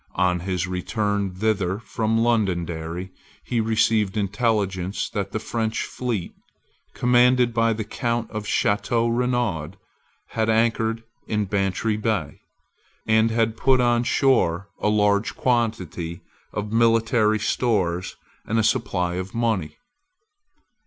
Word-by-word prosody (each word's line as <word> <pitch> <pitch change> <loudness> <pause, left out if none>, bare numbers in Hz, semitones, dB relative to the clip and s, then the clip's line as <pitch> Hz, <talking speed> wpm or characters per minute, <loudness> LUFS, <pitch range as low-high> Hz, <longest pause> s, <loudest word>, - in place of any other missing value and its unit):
On 90 -1 +2
his 90 0 -2
return 100 +1 -2
thither 95 -2 0
from 110 0 -1
Londonderry 90 -6 -1 0.3
he 120 -2 -1
received 110 -2 +1
intelligence 100 -2 -1
that 100 -1 -3
the - - -2
French 110 0 -2
fleet, 115 -8 -4 0.6
commanded 125 0 +4
by 115 0 +2
the 110 0 -3
Count 115 +1 -2
of 105 -1 -5
Chateau 115 +4 +1
Renaud, 115 -9 0 0.6
had 110 0 -1
anchored 115 0 +1 0.2
in 105 -1 0
Bantry 100 +2 0
Bay, 105 -9 -2 0.7
and 110 0 +3
had 115 -1 +1
put 130 +1 +3
on 120 -1 +3
shore 100 -9 +2
a 105 - +1
large 105 0 +2
quantity 95 -9 -1 0.3
of 105 0 -4
military 115 -1 +3
stores 95 -5 0 0.3
and 110 - 0
a 110 - +3
supply 100 -6 0
of 95 +3 -5
money. 110 -9 -1
110 Hz, 120 wpm, -23 LUFS, 95-115 Hz, 0.7 s, commanded